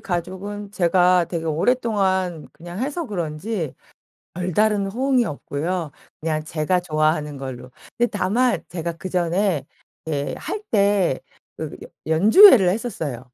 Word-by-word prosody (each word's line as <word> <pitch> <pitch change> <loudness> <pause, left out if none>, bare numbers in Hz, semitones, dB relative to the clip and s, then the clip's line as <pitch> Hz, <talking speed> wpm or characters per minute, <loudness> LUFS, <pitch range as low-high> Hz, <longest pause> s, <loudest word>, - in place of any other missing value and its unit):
가족은 195 +3 -5
제가 180 -1 +3
되게 165 -2 -4
오랫동안 190 -2 0
그냥 175 +5 -9
해서 295 +4 -3
그런지 170 - -3 0.6
별다른 200 +4 +1
호응이 250 +4 +1
없고요. 155 +3 -3 0.3
그냥 155 -1 -2
제가 160 +3 0
좋아하는 155 -3 0
걸로. 130 -2 -7 0.3
근데 240 - +3
다만 230 +5 +1
제가 170 -1 -4
그전에 175 -1 -1 0.4
예 145 -2 -2
할 420 - -5
때 200 - +2 0.4
그 155 -2 -6
여 - - -8 0.2
연주회를 200 - +7
했었어요. 160 - -4
180 Hz, 265 characters per minute, -22 LUFS, 155-205 Hz, 0.6 s, 연주회를